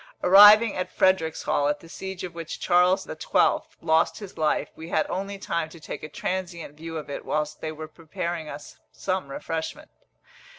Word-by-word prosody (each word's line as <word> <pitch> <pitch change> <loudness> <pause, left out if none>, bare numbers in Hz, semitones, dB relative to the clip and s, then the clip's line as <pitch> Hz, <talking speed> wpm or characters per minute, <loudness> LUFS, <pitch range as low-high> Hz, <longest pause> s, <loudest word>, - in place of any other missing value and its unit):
Arriving 210 +4 +8
at 185 - -3
Fredericshall, 160 -5 +1
at 150 - -1
the 165 - -15
siege 190 +2 -7
of 180 -2 -6
which 165 -1 -7
Charles 180 +2 +3
XII. 155 - +1 0.2
lost 160 0 +2
his 205 -3 -9
life, 155 -1 0
we 160 +1 -9
had 155 - +1
only 195 +1 -3
time 170 -4 -2
to 165 - -13
take - - -7
a 155 - -7
transient 175 -2 -4
view 165 +1 -7
of 155 - -6
it 140 - -6
whilst 150 0 -2
they 155 - -3
were 155 0 -8
preparing 170 0 -5
us 145 - -10
some 185 -6 -3
refreshment. 160 +3 -5
165 Hz, 175 wpm, -25 LUFS, 155-185 Hz, 0.2 s, Arriving